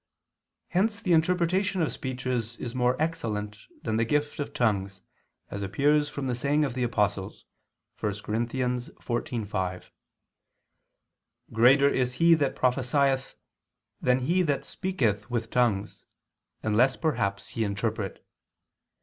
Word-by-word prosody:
Hence 205 Hz, +4 st, +1 dB
the 180 Hz, -6 st, +1 dB
interpretation 180 Hz, +4 st, +2 dB
of 155 Hz, -, 0 dB
speeches 125 Hz, -3 st, -3 dB
is 120 Hz, -1 st, -6 dB
more 125 Hz, 0 st, +1 dB
excellent 105 Hz, -11 st, -3 dB, 0.2 s
than 110 Hz, -2 st, 0 dB
the 115 Hz, -, +3 dB
gift 150 Hz, +6 st, -1 dB
of 145 Hz, -, -3 dB
tongues, 100 Hz, -5 st, -1 dB, 0.5 s
as 100 Hz, -, -4 dB
appears 145 Hz, +9 st, +2 dB
from 140 Hz, -, -5 dB
the 125 Hz, -, 0 dB
saying 145 Hz, +5 st, +1 dB
of 135 Hz, -, -3 dB
the 125 Hz, -, -3 dB
Apostle 105 Hz, -5 st, +1 dB, 0.7 s
(1 105 Hz, -, -1 dB
Cor. 105 Hz, +1 st, -6 dB
14:5), 120 Hz, -6 st, -3 dB, 1.7 s
"Greater 130 Hz, +5 st, +6 dB
is 125 Hz, -3 st, +1 dB
he 165 Hz, +4 st, +5 dB
that 145 Hz, -4 st, +1 dB
prophesieth 130 Hz, +1 st, +1 dB, 0.7 s
than 125 Hz, +1 st, +2 dB
he 170 Hz, +8 st, +2 dB
that 145 Hz, -5 st, 0 dB
speaketh 115 Hz, -, -1 dB
with 115 Hz, -2 st, -2 dB
tongues; 110 Hz, -5 st, 0 dB, 0.6 s
unless 115 Hz, +5 st, +3 dB
perhaps 100 Hz, -11 st, -1 dB
he 115 Hz, -, -2 dB
interpret." 100 Hz, -1 st, -3 dB
125 Hz, 125 wpm, -27 LUFS, 110-145 Hz, 1.7 s, Greater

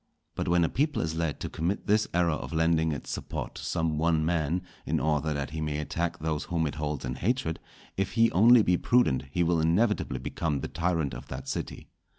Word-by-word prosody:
But -, -, -3 dB
when 85 Hz, 0 st, +3 dB
a -, -, +1 dB
people 150 Hz, -, 0 dB
is 80 Hz, 0 st, -2 dB
led 80 Hz, -2 st, -2 dB
to -, -, -2 dB
commit 85 Hz, +5 st, -2 dB
this 105 Hz, +1 st, +3 dB
error 85 Hz, -1 st, +2 dB
of 75 Hz, -, -4 dB
lending 80 Hz, 0 st, +2 dB
its 70 Hz, -4 st, -5 dB
support -, -, -5 dB
to -, -, -8 dB
some 80 Hz, -2 st, -1 dB
one 80 Hz, -1 st, +2 dB
man, 85 Hz, +1 st, 0 dB, 0.2 s
in -, -, 0 dB
order 75 Hz, 0 st, 0 dB
that 70 Hz, -1 st, -3 dB
he 80 Hz, 0 st, -4 dB
may 75 Hz, -1 st, -1 dB
attack 85 Hz, +3 st, -2 dB
those 75 Hz, -1 st, -2 dB
whom 85 Hz, -2 st, 0 dB
it 75 Hz, -, -2 dB
holds 75 Hz, -3 st, -3 dB
in 65 Hz, -, -3 dB
hatred, 110 Hz, -, -1 dB, 0.4 s
if 95 Hz, 0 st, -1 dB
he 115 Hz, 0 st, +4 dB
only 115 Hz, +4 st, +7 dB
be 90 Hz, -2 st, +3 dB
prudent 75 Hz, -, +2 dB
he 85 Hz, +6 st, +1 dB
will 85 Hz, -1 st, +2 dB
inevitably 105 Hz, +8 st, +1 dB
become 75 Hz, -5 st, -2 dB
the -, -, -3 dB
tyrant 85 Hz, -4 st, -1 dB
of 60 Hz, +3 st, -8 dB
that 65 Hz, +1 st, -7 dB
city. -, -, -5 dB
80 Hz, 215 wpm, -28 LUFS, 75-90 Hz, 0.4 s, only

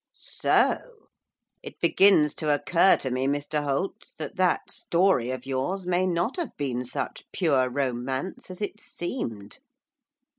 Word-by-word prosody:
'So! -, -, +2 dB, 0.8 s
It -, -, -10 dB
begins 190 Hz, -7 st, +5 dB
to 155 Hz, -1 st, -1 dB
occur 170 Hz, +5 st, +4 dB
to 130 Hz, -, -4 dB
me, 130 Hz, +1 st, 0 dB
Mr 145 Hz, +1 st, -1 dB
Holt, 145 Hz, +7 st, -3 dB
that 155 Hz, -3 st, -6 dB
that 185 Hz, -1 st, +1 dB
story 170 Hz, -9 st, +2 dB
of 130 Hz, 0 st, -5 dB
yours 135 Hz, +9 st, -2 dB
may 180 Hz, +1 st, +1 dB
not 180 Hz, -, -1 dB
have 345 Hz, -, -4 dB
been 125 Hz, -3 st, -2 dB
such 125 Hz, -, -4 dB
pure 140 Hz, -9 st, +2 dB
romance 130 Hz, +6 st, -3 dB
as 185 Hz, +3 st, -6 dB
it 205 Hz, +1 st, -4 dB
seemed. 115 Hz, -, -5 dB
150 Hz, 140 wpm, -26 LUFS, 130-185 Hz, 0.8 s, begins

